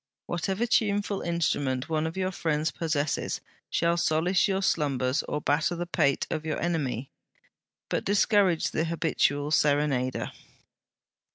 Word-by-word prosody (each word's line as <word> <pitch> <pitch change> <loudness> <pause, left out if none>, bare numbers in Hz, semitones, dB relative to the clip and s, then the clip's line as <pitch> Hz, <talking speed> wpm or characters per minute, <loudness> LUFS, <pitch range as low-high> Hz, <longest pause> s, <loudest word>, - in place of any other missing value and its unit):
Whatever 190 +6 -1
tuneful 205 -3 +1
instrument 145 -6 0
one 160 -1 0
of 160 - -6
your 185 0 0
friends 160 -3 -1
possesses 155 0 -1 0.3
shall 170 0 +1
solace 170 +4 +2
your 195 0 0
slumbers 135 -7 +1
or 150 - -2
batter 160 +6 +1
the 175 +1 -3
pate 150 -6 +1
of 155 -1 -2
your 155 -1 -2
enemy. 140 -7 -2 0.8
But - - -1
discourage 200 -3 +3
the 160 - 0
habitual 150 -3 0
serenader.' 145 -4 +1
160 Hz, 125 wpm, -27 LUFS, 145-175 Hz, 0.8 s, discourage